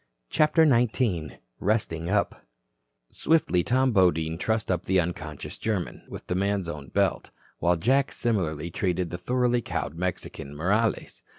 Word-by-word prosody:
CHAPTER 155 +1 +4
XIX 115 - +1 0.3
RESTING 90 -6 -1
UP 100 0 0 0.7
Swiftly 145 - +2
Tom 130 +4 +2
Bodine 80 -5 +2
trussed 110 -1 0
up 90 -2 -1
the 95 0 +3
unconscious 80 -3 -4
German 105 -6 -2
with - - -9
the - - -2
man's 100 0 0
own 75 -4 -6
belt, - - 0 0.3
while 90 0 +3
Jack 130 +10 +2
similarly 85 -8 -1
treated 90 -1 -1
the 85 - -5
thoroughly 125 +3 +1
cowed 75 - -3
Mexican, 80 -5 -4
Morales. 100 +8 0
95 Hz, 135 wpm, -26 LUFS, 85-115 Hz, 0.7 s, CHAPTER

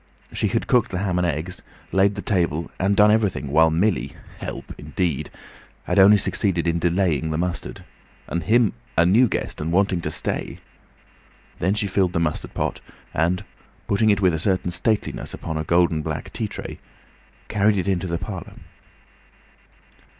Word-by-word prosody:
She - - 0
had - - -1
cooked 120 -1 +3
the 90 - -3
ham 90 -2 0
and 90 - +2
eggs, 85 +3 -3 0.3
laid 100 +1 +3
the 100 - -5
table, 85 -4 0
and 100 +2 +2
done 105 +1 +6
everything, 105 -10 +1
while 80 +3 +5
Millie 90 +5 0 0.3
(help - - -6
indeed!) 85 -7 -2 0.5
had - - +1
only 100 +2 +8
succeeded 95 -3 0
in 85 0 +1
delaying 85 -3 +1
the 80 - -1
mustard. 90 +1 -3 0.4
And 85 - -3
him 110 +4 +3 0.2
a 80 - +5
new 110 +8 +5
guest - - -3
and 80 +2 -2
wanting 95 -1 +2
to - - -3
stay! - - -4 1.0
Then 95 +4 +1
she 105 -1 0
filled 95 -2 +1
the 85 - +1
mustard 80 -2 -2
pot, - - -2 0.3
and, 90 +5 0 0.4
putting 110 +2 +2
it 100 -1 +3
with 90 -3 +4
a 80 - -1
certain 90 0 0
stateliness 105 +4 -1
upon 80 - -5
a 80 - -1
gold 85 +1 +3
and 80 -2 -2
black - - -5
tea - - -2
tray, - - -7 0.7
carried 105 0 +2
it 95 - -1
into 95 -1 0
the 85 -1 -1
parlour. 95 -1 -7
90 Hz, 170 wpm, -23 LUFS, 85-100 Hz, 1.0 s, only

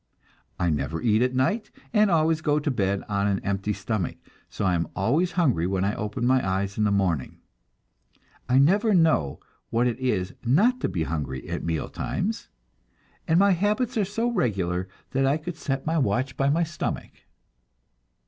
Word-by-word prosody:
I 85 -2 +1
never 80 +2 -2
eat 110 -1 +2
at 125 +1 +1
night, 165 - 0 0.2
and 210 -2 +4
always 160 -2 +2
go 150 -1 +2
to 145 -1 0
bed 100 -5 0
on 100 -1 0
an 100 -1 +1
empty 100 +1 -1
stomach, 100 -2 -3 0.3
so - - -3
I 90 - +3
am 85 -2 0
always 145 - +1
hungry 130 - +2
when 95 0 0
I 100 - 0
open 105 +3 -3
my 130 +1 +3
eyes 95 +1 -1
in 105 - +1
the 105 - +2
morning. 90 -8 0 1.1
I 125 - +4
never 200 - +4
know 155 - +2 0.3
what 115 +2 +1
it 120 -1 -1
is 105 -8 -1
not 205 - +3
to - - -1
be 85 - -1
hungry 75 -5 -4
at - - -4
meal 80 -1 -2
times, 220 +4 -3 0.8
and 165 -1 +3
my 200 +2 +5
habits 210 +7 +1
are 215 - +2
so 225 +5 -1
regular 95 - -1 0.2
that 135 0 +2
I 140 +3 +2
could 160 +2 -6
set 135 -4 -3
my 160 +1 +1
watch 125 +2 0
by 135 +1 +1
my 165 +4 +2
stomach. 170 +1 -4
125 Hz, 180 wpm, -25 LUFS, -, 1.1 s, my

